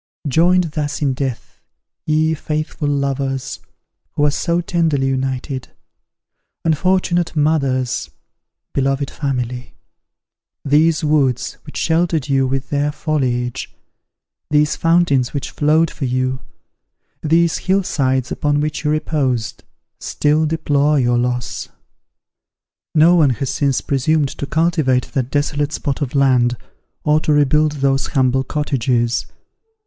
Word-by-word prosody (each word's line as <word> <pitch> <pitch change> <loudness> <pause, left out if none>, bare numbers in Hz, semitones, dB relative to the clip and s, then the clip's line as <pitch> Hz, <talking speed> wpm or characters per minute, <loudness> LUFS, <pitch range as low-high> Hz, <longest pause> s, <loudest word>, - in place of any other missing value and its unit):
Joined 170 +4 +3
thus 150 -1 -3
in 135 -2 +1
death, 130 -2 -5 0.5
ye 155 +1 +2
faithful 155 -1 -3
lovers, 135 -2 -2 0.5
who 145 - 0
were 150 - +4
so 170 +4 0
tenderly 165 -5 0
united! 130 0 -3 1.0
unfortunate 175 +1 +1
mothers! 140 -5 0 0.6
beloved 135 +1 0
family! 125 -3 -4 0.9
these 155 +3 +3
woods 145 -5 +1
which 150 - -8
sheltered 165 -3 +1
you 135 -2 +2
with 135 0 -3
their 145 0 +1
foliage, 125 -6 -2 0.7
these 150 0 +2
fountains 165 -7 +2
which 140 - -3
flowed 155 +2 +2
for 140 - -4
you, 130 +1 -1 0.8
these 165 +2 +2
hill 195 +1 +1
sides 130 -6 0
upon 145 0 0
which 150 +1 -2
you 150 - 0
reposed, 145 -7 -1 0.4
still 155 +1 +1
deplore 150 -2 +1
your 120 -1 +2
loss! 125 0 -3 1.3
No 160 +3 +6
one 160 -5 +5
has 130 +2 -2
since 140 -2 0
presumed 145 +1 +1
to 140 - -6
cultivate 155 -6 +1
that 130 -2 -1
desolate 145 +1 -1
spot 140 -1 -3
of 140 -1 -3
land, 125 -3 +3 0.5
or 150 +1 +3
to 155 - -1
rebuild 150 +1 +3
those 135 -1 0
humble 130 0 +1
cottages. 125 -5 -1
145 Hz, 120 wpm, -18 LUFS, 130-155 Hz, 1.3 s, No